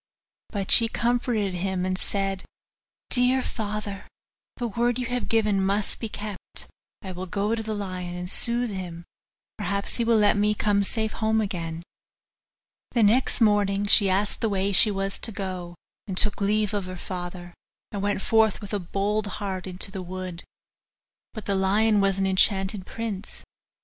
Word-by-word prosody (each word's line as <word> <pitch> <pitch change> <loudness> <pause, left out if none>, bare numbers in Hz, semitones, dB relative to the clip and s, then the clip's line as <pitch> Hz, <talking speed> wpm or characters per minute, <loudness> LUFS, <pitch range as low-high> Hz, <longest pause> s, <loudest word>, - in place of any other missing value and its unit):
But 200 -3 -3
she 230 - +8
comforted 235 -4 0
him, 185 0 -2
and 185 0 0
said, 195 0 -1 0.7
'Dear 255 +1 +3
father, 210 -2 -4 0.5
the 240 - -2
word 235 +3 0
you 250 - -2
have 245 +1 -2
given 210 -4 +2
must 200 +2 +1
be 225 - -4
kept; 205 -2 -7 0.4
I 190 - -6
will 185 +1 -6
go 205 +4 -1
to 230 - -1
the 220 -1 -3
lion, 185 -3 -5
and 180 0 -5
soothe 235 +4 +2
him: 175 -3 -6 0.6
perhaps 200 +2 0
he 235 - +1
will 230 -1 +3
let 210 -1 +4
me 210 +1 +2
come 205 -1 +2
safe 220 +2 -1
home 220 0 +1
again.' 170 -5 -3 1.1
The 235 - +3
next 235 +4 +3
morning 205 -2 +3
she 200 -1 +6
asked 200 +2 0
the 225 - +1
way 195 0 0
she 210 - +8
was 195 -1 -2
to 225 - -1
go, 185 -3 -5 0.3
and 190 -2 -4
took 210 0 0
leave 210 +1 +1
of 200 -2 -1
her 185 0 -7
father, 175 -1 -6 0.4
and 200 -3 -4
went 200 -1 -1
forth 220 -2 +3
with 205 -1 -8
a 205 - +1
bold 200 +4 -1
heart 190 -2 -4
into 185 +1 -1
the 190 -1 -5
wood. 185 -1 -6 0.9
But 215 - -7
the 200 - 0
lion 205 +2 +3
was 195 -1 +2
an 195 - +1
enchanted 190 0 +2
prince. 220 -3 -5
200 Hz, 170 wpm, -25 LUFS, 190-215 Hz, 1.1 s, she